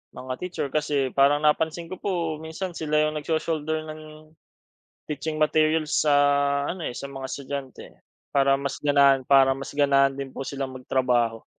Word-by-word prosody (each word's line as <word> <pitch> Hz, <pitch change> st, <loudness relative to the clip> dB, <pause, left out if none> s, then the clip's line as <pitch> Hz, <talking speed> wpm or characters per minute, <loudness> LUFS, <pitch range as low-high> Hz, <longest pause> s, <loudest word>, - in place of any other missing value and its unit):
mga 130 Hz, 0 st, -5 dB
teacher. 180 Hz, -5 st, -3 dB
Kasi 145 Hz, -3 st, 0 dB
parang 145 Hz, +2 st, +3 dB
napansin 160 Hz, +3 st, 0 dB
ko 185 Hz, -, -6 dB
po 170 Hz, -5 st, -2 dB
minsan 160 Hz, +4 st, -5 dB
sila 155 Hz, -2 st, -3 dB
'yong 155 Hz, 0 st, -1 dB
nag-sho-shoulder 155 Hz, 0 st, -2 dB
ng, 155 Hz, 0 st, -11 dB, 0.7 s
teaching 155 Hz, +1 st, -4 dB
materials 155 Hz, 0 st, +2 dB
sa 150 Hz, -, +1 dB, 0.6 s
ano, 175 Hz, +2 st, -4 dB
eh, 120 Hz, -, -8 dB
sa -, -, -6 dB
mga 135 Hz, -1 st, -7 dB
estudyante. 140 Hz, -1 st, -6 dB, 0.5 s
Para 135 Hz, -1 st, +3 dB
mas 140 Hz, 0 st, -5 dB
ganahan 140 Hz, -2 st, +4 dB
para 135 Hz, -1 st, +6 dB
mas 135 Hz, +1 st, -7 dB
ganahan 140 Hz, -1 st, +4 dB
din 135 Hz, -1 st, -6 dB
po -, -, -6 dB
silang 135 Hz, -1 st, -4 dB
magtrabaho. 125 Hz, -3 st, 0 dB
145 Hz, 155 wpm, -25 LUFS, 135-155 Hz, 0.7 s, para